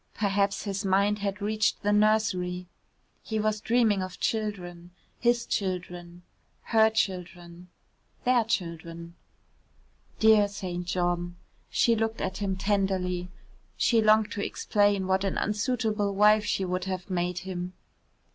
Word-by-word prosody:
Perhaps 200 -1 0
his 200 0 -3
mind 200 +2 +2
had 200 0 -3
reached 215 0 0
the 205 - +2
nursery. 205 -4 +1 0.6
He 220 -1 -3
was 215 0 0
dreaming 220 -4 +2
of 185 -1 -6
children, 180 -6 -3 0.3
his 240 0 +2
children, 180 -2 -4 0.4
her 220 -1 +4
children, 180 -4 -4 0.6
their 245 -1 +3
children. 170 -5 -4 1.0
Dear 220 -2 +5
St. 180 -3 -5
John. 175 -1 -1 0.3
She 235 - +3
looked 225 0 -1
at 190 - -3
him 195 -2 -2
tenderly. 190 -2 -1 0.5
She 230 -2 +3
longed 215 0 +4
to 205 - -3
explain 205 -2 +1
what 190 +1 +1
an 195 - -1
unsuitable 210 -2 -1
wife 210 +1 +5
she 195 -2 0
would 185 +1 -2
have 190 0 -5
made 180 0 -1
him. 180 -1 -5
200 Hz, 130 wpm, -27 LUFS, 180-215 Hz, 1.0 s, Dear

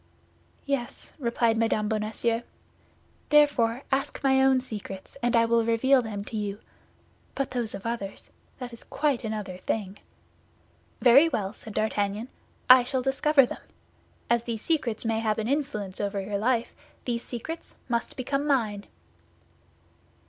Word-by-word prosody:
"Yes," 275 -4 -3
replied 235 -3 +1
Mme. 220 -2 +1
Bonacieux; 220 +2 -1 0.9
"therefore, 280 -5 +4
ask 275 +2 0
my 265 -1 +4
own 265 -1 +5
secrets, 205 -6 -8
and 240 0 +2
I 230 0 +5
will 230 0 +3
reveal 250 +4 +4
them 205 -3 -5
to 220 - -5
you; 205 -1 -3 0.8
but 275 - -2
those 235 -4 -2
of 195 - -9
others—that 235 +3 -7
is 235 - -11
quite 290 -5 0
another 210 -4 -4
thing." 200 0 -3 1.0
"Very 270 +6 +7
well," 200 -8 -2
said 220 -1 -10
D'Artagnan, 215 +1 -1 0.4
"I 255 0 +10
shall 255 +1 -1
discover 275 +1 +4
them; - - -7 0.7
as 235 0 +3
these 230 -2 -5
secrets 250 -10 0
may 225 0 +1
have 215 -1 0
an 220 0 -2
influence 260 -9 -2
over 200 -1 -1
your 200 +1 -3
life, 235 +1 +1 0.3
these 235 -2 -1
secrets 320 +8 -6
must 235 +1 -2
become 275 +3 -1
mine." 215 -8 +1
235 Hz, 140 wpm, -27 LUFS, 215-260 Hz, 1.0 s, I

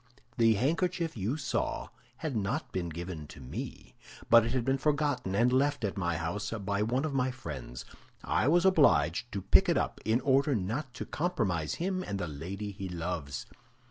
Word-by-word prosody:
The 115 -2 +5
handkerchief 165 - 0
you 110 +7 -1
saw 150 - -2 0.3
had 155 -5 -3
not 125 +6 -1
been 85 -2 -2
given 85 -2 -6
to 70 - -12
me, 65 -1 -7 0.4
but 115 -1 +9
it 115 - -1
had 130 -3 0
been 135 0 +1
forgotten 145 -8 0
and 120 +4 +3
left 140 0 +2
at 100 - -2
my 85 -4 -1
house 85 +7 -3 0.2
by 100 0 0
one 125 +7 +1
of 155 - -2
my 130 -1 +1
friends. 70 - -7 0.4
I - - +1
was 175 +4 +4
obliged 120 - +4
to 100 -2 -4
pick - - +5
it - - +3
up - - -2
in 110 +3 +2
order 135 +1 +3
not 115 +8 -2
to - - -5
compromise 100 - -1
him 185 +2 -1
and 100 - -3
the 90 -3 -3
lady 95 +8 -5
he 95 -1 -6
loves. 85 -7 -4
115 Hz, 185 wpm, -30 LUFS, 90-140 Hz, 0.4 s, but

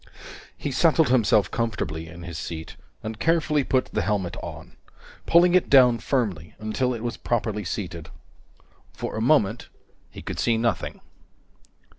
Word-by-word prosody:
He 145 - -4
settled 160 +1 +3
himself 110 -5 +3
comfortably 80 -9 -3
in 85 +1 -11
his 85 -2 -6
seat, 80 -1 -6 0.3
and 110 0 -6
carefully 160 -3 +2
put 130 0 +1
the - - +1
helmet 100 -5 -1
on, - - -9 0.5
pulling 175 +1 +5
it 185 - +3
down 125 -4 +6
firmly 105 - -2
until 115 +4 -1
it 115 - -7
was 120 0 -3
properly 110 -3 -1
seated. 85 -3 -5 0.8
For - - -5
a 110 - -2
moment, 115 -4 +2 0.4
he - - -11
could - - -5
see 115 -1 +2
nothing. 115 -2 -2
115 Hz, 145 wpm, -25 LUFS, 95-130 Hz, 0.8 s, down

